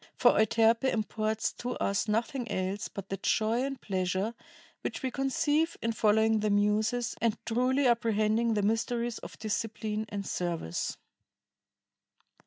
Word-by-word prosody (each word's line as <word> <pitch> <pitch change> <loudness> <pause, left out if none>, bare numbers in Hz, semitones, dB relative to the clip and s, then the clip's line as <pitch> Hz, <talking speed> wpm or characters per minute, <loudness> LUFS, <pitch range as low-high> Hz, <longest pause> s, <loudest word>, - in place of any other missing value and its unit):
For - - +6
Euterpe 225 +2 +3
imports 215 0 -1
to 250 +1 -3
us 200 +2 0
nothing 235 +3 -1
else 190 +3 -2
but 200 -2 -8
the 195 - -2
joy 220 +5 +1
and 275 -1 -3
pleasure 190 +1 -1 0.5
which - - -4
we 260 - -1
conceive 295 +5 +1
in 230 - -1
following 220 0 +3
the 210 0 0
Muses 215 +4 +1
and 230 -1 +2
truly 255 +4 +2
apprehending 225 -1 +2
the 205 - +1
mysteries 235 +2 0
of - - -10
discipline 215 0 -3
and 200 -1 -4
service." 170 - -2
220 Hz, 135 wpm, -30 LUFS, 210-235 Hz, 0.5 s, For